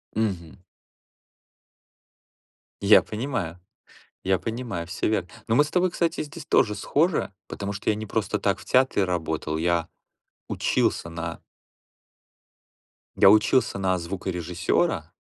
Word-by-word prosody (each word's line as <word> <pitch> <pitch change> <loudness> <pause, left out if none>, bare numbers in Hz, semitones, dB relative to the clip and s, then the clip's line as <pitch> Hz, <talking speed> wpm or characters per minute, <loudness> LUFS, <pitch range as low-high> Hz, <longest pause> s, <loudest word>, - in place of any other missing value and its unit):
Мгм. 95 -7 -2 2.3
Я 100 +1 +7
понимаю. 105 - -4 0.7
Я 95 0 +2
понимаю, 110 -5 -4
всё 85 - -2
верно. 95 -5 0 0.2
Но 115 - +1
мы 145 - +5
с 150 - -7
тобой, 180 0 +2
кстати, 170 -1 -1
здесь 150 +1 -9
тоже 105 - +3
схожи, 150 - +1
потому 100 0 -5
что 100 - -1
я 105 - +2
не 110 0 -5
просто 105 0 -1
так 100 -2 0
в - - -12
театре 130 -6 +3
работал, 80 -3 -2
я 85 0 0 0.6
учился 85 - 0
на 85 0 -6 1.8
я - - +8
учился 110 0 +3
на 95 -1 +1
звукорежиссёра, 90 -1 -1
100 Hz, 120 wpm, -25 LUFS, 85-115 Hz, 2.3 s, я